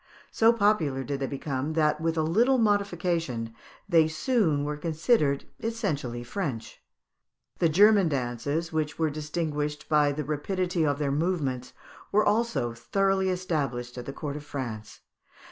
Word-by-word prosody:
So 225 +1 +5
popular 200 - +1
did 140 0 -3
they 135 - -1
become, 140 +1 -3
that 155 -1 +2
with 165 0 0
a 160 - +2
little 235 +12 +3
modification 175 - 0 0.3
they 165 -4 +5
soon 160 - +1
were 150 +1 -2
considered 155 - +1
essentially 150 - -3
French. 125 - -5 0.8
The 170 - +3
German 200 +2 +5
dances, 140 +5 -2
which 155 -2 -1
were 160 -2 +1
distinguished 150 -1 -3
by 150 -2 +3
the 150 +2 -3
rapidity 175 +4 -1
of 145 -1 +1
their 145 -2 -1
movements, 140 -5 -1 0.4
were 210 +1 +3
also 220 - +1
thoroughly 195 +8 +1
established 140 -10 -2
at 125 -1 -7
the - - -3
court 145 0 -5
of 150 - -6
France. 115 -7 -6
155 Hz, 145 wpm, -27 LUFS, 140-185 Hz, 0.8 s, So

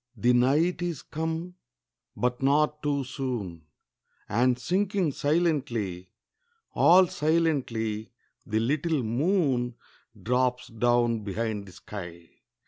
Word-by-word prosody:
The 125 +1 +3
night 150 +9 +2
is 170 -5 -3
come, 165 +3 -4 0.6
but 125 +1 -1
not 150 +2 +2
too 145 -2 0
soon; 120 - -5 0.6
And 125 +3 +2
sinking 185 - 0
silently, 130 - -1 0.6
All 185 +2 +6
silently, 140 -11 0 0.3
the 110 +1 -1
little 145 +4 0
moon 125 - +1 0.4
Drops 125 +4 0
down 120 0 +2
behind 105 0 -3
the - - -11
sky. 85 -5 -9
125 Hz, 100 wpm, -27 LUFS, 115-155 Hz, 0.6 s, All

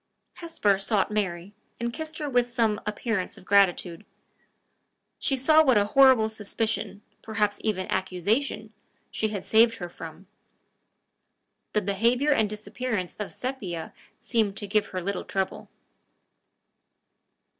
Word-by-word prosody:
Hesper 325 - +1
sought 195 0 +1
Mary, 190 -2 -2 0.3
and 235 0 -2
kissed 315 +1 -6
her 300 - -3
with 245 -3 +2
some 225 -3 0
appearance 210 -2 -2
of - - -15
gratitude. 190 -2 +2 1.2
She 270 - +1
saw 310 +5 +5
what 260 -6 +4
a 205 - +3
horrible 260 -1 +6
suspicion, 215 -1 -3 0.2
perhaps 210 -2 -1
even 195 -4 -1
accusation, 210 +5 -1 0.4
she 220 - 0
had 210 -3 -5
saved 230 +1 +5
her 175 -5 -6
from. 165 +2 -10 1.5
The 210 - +1
behavior 235 +9 +2
and 220 -7 +3
disappearance 215 -2 -4
of 210 - -5
Sepia 195 -11 -5 0.3
seemed 215 -4 0
to 205 - -3
give 210 +1 +1
her 185 -1 -5
little 200 +1 -2
trouble. 190 -1 -3
215 Hz, 125 wpm, -26 LUFS, 195-240 Hz, 1.5 s, horrible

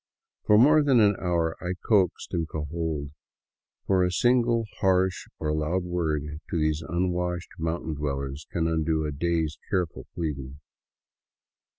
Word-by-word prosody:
For 105 - +6
more 150 +7 +6
than 135 -4 +4
an 105 -2 +5
hour 85 -3 0
I 90 +1 -2
coaxed 95 -6 +2
and 85 -2 -1
cajoled, 75 -1 -3 0.7
for 95 -2 +3
a 90 - +1
single 120 +2 +3
harsh 95 -2 +2
or 75 -1 -1
loud 80 +4 0
word 85 -4 -1 0.3
to - - -1
these 75 0 +1
unwashed 90 +2 -2
mountain 80 0 -2
dwellers 70 -1 -4
can 80 -1 0
undo 80 -1 0
a 75 - -2
day's 80 +1 -1
careful 90 -5 -2
pleading. 70 -5 -4
85 Hz, 135 wpm, -26 LUFS, 75-90 Hz, 0.7 s, For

